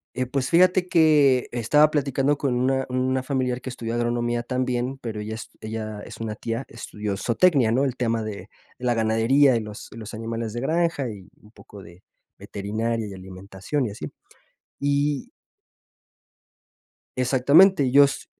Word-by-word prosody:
Eh, 130 0 -1
pues 130 0 -2
fíjate 180 +1 +4
que 150 -7 +4
estaba 150 +6 +4
platicando 140 -1 0
con 135 -4 -1
una 135 +1 +1
una 130 +1 0
familiar 130 -2 -1
que 130 - -7
estudió 115 -2 -5
agronomía 120 0 -1
también, 125 +1 -2
pero 110 -4 -6
ella 110 +1 -5
es 110 - -9
ella 110 -1 -5
es 115 - -10
una 110 -2 -4
tía, 115 +4 -4
estudió 105 -3 -5
zootecnia, 125 - +2
¿no? 130 +4 +2
El 130 - -1
tema 115 -2 -1
de 105 -2 -7 0.3
la 125 -1 0
ganadería 115 +5 +3
y 115 - +1
los 105 -1 -9
y - - -11
los 110 -1 -8
animales 115 0 -4
de 120 - -4
granja 165 -3 0
y 95 -3 -11
un 105 +1 -20
poco 100 - -14
de 85 +2 -16 0.4
veterinaria 110 +2 -3
y 100 - -8
alimentación 95 +8 -5
y - - -4
así. 75 -7 -7 0.7
Y 145 0 0 1.9
Exactamente, 135 +4 +4
yo 140 +2 +7
s 140 - -3
120 Hz, 160 wpm, -24 LUFS, 110-135 Hz, 1.9 s, yo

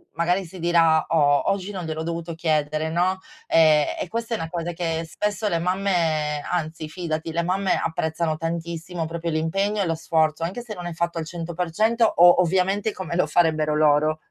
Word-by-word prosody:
magari 175 +3 +1
si 175 +3 -11
dirà 165 -2 +3
o 145 +1 +3
oggi 195 0 -3
non 190 -3 -5
gliel'ho 160 0 -4
dovuto 170 0 -4
chiedere, 155 -1 0
no, 180 +3 0 0.3
e 155 - +5
e - - -3
questo 230 +3 -3
è - - 0
una 165 -5 -5
cosa 170 0 -3
che 165 -1 -2
spesso 210 +5 -2
le 170 - 0
mamme 165 -5 0
anzi, 155 -2 -3
fidati 165 -1 -4
le 170 +1 -1
mamme 190 +2 +1
apprezzano 160 0 -1
tantissimo 165 +1 -4
proprio 170 +1 -4
l'impegno 195 +7 0
e - - +1
lo 165 - +1
sforzo, 160 -1 0
anche 185 +8 -3
se 235 -3 -8
non 175 -2 -7
hai 175 - -5
fatto 170 0 -2
al 160 - -4
100% 175 +7 0
o 175 -4 +6
ovviamente 190 +4 +1
come 180 -2 -5
lo 175 - +2
farebbero 155 -2 +2
loro. 155 0 +3
170 Hz, 185 wpm, -23 LUFS, 160-180 Hz, 0.3 s, o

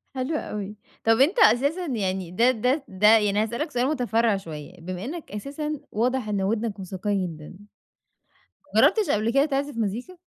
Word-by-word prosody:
حلو 260 +5 -2
أوي. 210 -6 -5 0.3
طَب 225 0 +4
أنت 345 - +3
أساسًا 325 - +4
يعني 190 - -2
ده 235 +7 +4
ده 255 +5 0
ده 190 +2 +2
يعني 210 -1 +1
هاسألك 235 +8 -3
سؤال 245 +1 +1
متفرّع 235 -6 +1
شوية، 160 -5 -8
بما 185 +3 -5
إنك 320 +5 -7
أساسًا 285 +8 -4
واضح 245 +1 0
إن 200 -2 0
وِدنك 215 +1 -1
موسيقية 190 +1 -2
جدًا، 155 -3 -9 1.3
ما - - +5
جربتش 435 -3 +4
قبل 215 +2 +1
كده 275 +2 +4
تِعزف 285 -2 -2
مزيكا؟ 230 - -3
225 Hz, 165 wpm, -25 LUFS, 200-275 Hz, 1.3 s, ما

